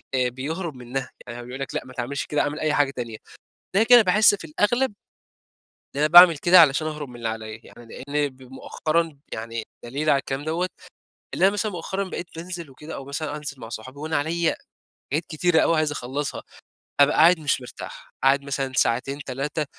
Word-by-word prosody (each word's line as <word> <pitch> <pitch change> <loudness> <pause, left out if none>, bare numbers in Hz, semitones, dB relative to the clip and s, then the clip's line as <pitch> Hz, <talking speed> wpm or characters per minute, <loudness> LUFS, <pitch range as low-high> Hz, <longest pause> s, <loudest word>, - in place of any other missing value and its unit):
آآ، 125 -1 +2
بيهرب 155 +6 -5
منها، 125 +1 -5 0.2
يعني 120 0 -7
هو 120 - -8
بيقول 125 +2 -8
لك 135 - -5
لأ - - 0
ما 130 - -12
تعملش 135 +3 -3
كده، 150 - 0
أعمل 145 +1 -2
أي 155 -1 0
حاجة 145 -2 +2
تانية، 115 -4 -6 0.6
ده 210 - +5
كده 245 +1 +8
باحس 205 +1 +5
في 185 - -10
الأغلب 210 +9 +1 1.0
إن 140 - -3
أنا 150 - +4
باعمل 175 0 +9
كده 175 +4 +6
علشان 155 +1 +3
أهرب 150 -3 -5
من 120 - -12
اللي 115 -1 -4
عليّا، 110 0 -6
يعني 120 - -15 0.2
لإن 145 0 0
ب 130 0 -21
مؤخرًا 155 +4 -2
يعني 115 0 -5 0.2
دليل 140 +6 -2
على 140 - +4
الكلام 135 +1 -4
دوّة، 170 +3 -1 0.7
إن - - -3
أنا 195 - +7
مثلًا 205 +1 -2
مؤخرًا 190 +3 -3
بقيت 175 - -5
بانزل 170 -2 -7
وكده 150 +4 -10
أو 135 - -7
مثلًا 145 +2 -4
أنزل 145 -3 -7
مع 115 - -8
صحابي 130 +5 -8
وأنا 155 +2 -2
عليّا 165 +3 0 0.6
حاجات 155 +3 0
كتيرة 160 +1 +2
أوي 165 - +3
عايز 155 -1 +1
أخلّصها، 140 +2 -4 0.6
أبقى 140 - +5
قاعد 170 +3 +6
مش 145 -3 0
مرتاح، 125 - -10
قاعد 135 +1 +4
مثلًا 135 -1 -3
ساعتين، 130 +4 +1
3 140 +4 -2
145 Hz, 195 wpm, -24 LUFS, 130-165 Hz, 1.0 s, باعمل